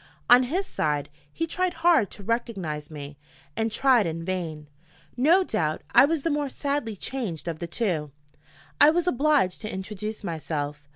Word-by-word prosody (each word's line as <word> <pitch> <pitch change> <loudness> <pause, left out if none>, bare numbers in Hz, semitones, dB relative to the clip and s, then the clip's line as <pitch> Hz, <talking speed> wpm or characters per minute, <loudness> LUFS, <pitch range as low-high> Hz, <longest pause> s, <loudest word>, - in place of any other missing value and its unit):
On 245 +1 +9
his 375 +6 0
side, 150 - -1 0.2
he 330 - -2
tried 365 +2 -1
hard 320 - +5
to 200 - -10
recognize 190 -10 -3
me, 145 -2 -9 0.4
and 225 0 -1
tried 245 -4 +3
in 165 0 -4
vain. 165 -5 -4 0.5
No 320 +10 +4
doubt 160 - -1
I - - +8
was 310 -1 -1
the 330 - +1
more 290 -1 -1
sadly 280 -5 -2
changed 200 - -4
of 165 -2 -3
the 170 - -4
two: 170 -6 -1 0.7
I 290 - +8
was 345 +2 +1
obliged 290 - +2
to 215 0 -5
introduce 210 +3 -5
myself. 150 -4 -4
215 Hz, 165 wpm, -26 LUFS, -, 0.7 s, On